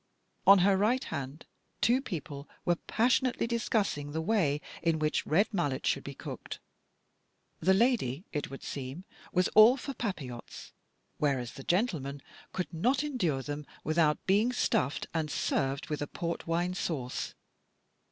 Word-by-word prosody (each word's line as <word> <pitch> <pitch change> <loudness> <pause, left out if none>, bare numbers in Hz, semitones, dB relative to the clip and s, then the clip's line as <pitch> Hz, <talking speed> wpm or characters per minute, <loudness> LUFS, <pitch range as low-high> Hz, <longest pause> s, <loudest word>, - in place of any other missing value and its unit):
On 200 +1 +10
her 200 -1 +5
right 230 +6 +2
hand 140 +2 -5 0.3
two 245 +4 +3
people 150 - -6 0.2
were 175 -1 +2
passionately 245 +5 +1
discussing 210 -10 -1
the 160 - -1
way 160 -7 +2 0.2
in 165 -1 +2
which 155 0 0
red 200 +8 +3
mullet 145 -8 -1
should - - +1
be - - -7
cooked. - - -7 1.0
The 190 +1 +4
lady, 200 - +2
it 150 - -2
would 135 - -9
seem, 135 +5 -5 0.3
was 180 0 +3
all 225 +5 +8
for 275 +1 -5
papilottes, 155 - -6 0.5
whereas 135 -5 0
the 135 - -10
gentleman 150 - 0 0.3
could 185 - -4
not 250 - +2
endure 180 - -1
them 145 +1 -5 0.2
without 155 -1 +2
being 210 +6 +3
stuffed 140 - 0
and 160 -2 -1
served 135 -1 -1
with 150 - -2
port 170 0 -3
wine 175 +2 0
sauce. 140 -8 -3
170 Hz, 140 wpm, -30 LUFS, 145-215 Hz, 1.0 s, On